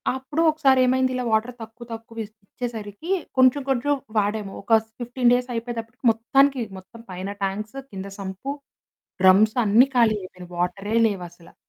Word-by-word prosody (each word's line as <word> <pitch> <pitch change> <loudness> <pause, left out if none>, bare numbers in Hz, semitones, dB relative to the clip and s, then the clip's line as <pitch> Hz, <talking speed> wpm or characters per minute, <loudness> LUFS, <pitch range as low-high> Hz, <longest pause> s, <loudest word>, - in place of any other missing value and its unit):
అప్పుడు 265 +4 -3
ఒకసారేమైంది 260 -4 +3
ఇలా 250 - -2
వాటర్ 220 +3 +1
తక్కువ, 225 +2 -10
తక్కువ 225 0 -7
ఇచ్ 215 +1 -19
ఇచ్చేసరికి 225 - -7 0.3
కొంచెం 255 +2 +5
కొంచెం 270 +2 +1 0.2
వాడాము. 205 -1 -1
ఒక 225 +3 +4 0.2
15 245 0 +1
డేస్ 250 0 0
అయిపోయేతప్పటికి 230 +1 -6
మొత్తానికి 270 +4 +2 0.2
మొత్తం 190 +5 -13
పైన 185 +2 -5
టాంక్సు, 210 +5 -3
కింద 195 0 -6
సంపు, 190 +7 -5 0.7
డ్రమ్స్ 200 +4 +5
అన్నీ 225 +6 +5
ఖాళీ 230 -3 +5
అయిపోయినాయి. 180 -1 -11
వాటరే 195 +4 -2
లేవసలా! 175 -4 -6
225 Hz, 140 wpm, -23 LUFS, 200-255 Hz, 0.7 s, కొంచెం